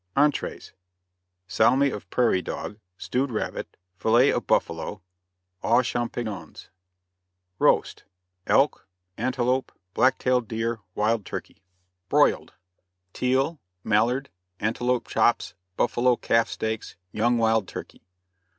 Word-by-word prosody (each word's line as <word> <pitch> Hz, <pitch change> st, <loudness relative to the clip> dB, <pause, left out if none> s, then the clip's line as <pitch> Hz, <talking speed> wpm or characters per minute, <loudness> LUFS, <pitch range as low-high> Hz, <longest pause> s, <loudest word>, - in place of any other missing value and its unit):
ENTREES. 145 Hz, 0 st, 0 dB, 0.7 s
Salmi 130 Hz, +7 st, +3 dB
of 100 Hz, -5 st, -7 dB
Prairie 115 Hz, -6 st, +2 dB
Dog, 105 Hz, +4 st, -6 dB, 0.2 s
Stewed 135 Hz, +2 st, -1 dB
Rabbit, 110 Hz, -3 st, -4 dB, 0.2 s
Fillet 120 Hz, +8 st, +4 dB
of -, -, -2 dB
Buffalo, -, -, -1 dB, 0.6 s
Aux 120 Hz, +3 st, +4 dB
Champignons. 115 Hz, -8 st, -4 dB, 0.9 s
ROAST. -, -, +2 dB, 0.4 s
Elk, 140 Hz, -6 st, +2 dB, 0.3 s
Antelope, 130 Hz, +2 st, 0 dB, 0.2 s
Black 130 Hz, +2 st, +3 dB
tailed 125 Hz, -2 st, +1 dB
Deer, 115 Hz, +1 st, -2 dB, 0.2 s
Wild 110 Hz, +1 st, +1 dB
Turkey. -, -, -7 dB, 0.5 s
BROILED. -, -, +3 dB, 0.6 s
Teal, 135 Hz, +5 st, 0 dB, 0.2 s
Mallard, 120 Hz, +6 st, +1 dB, 0.3 s
Antelope 120 Hz, +3 st, 0 dB
Chops, -, -, +1 dB, 0.2 s
Buffalo 120 Hz, +1 st, +2 dB
Calf 115 Hz, 0 st, +1 dB
Steaks, 110 Hz, 0 st, -4 dB, 0.2 s
Young 120 Hz, +3 st, +2 dB
Wild 110 Hz, -3 st, +2 dB
Turkey. -, -, -9 dB
120 Hz, 100 wpm, -25 LUFS, 110-125 Hz, 0.9 s, Fillet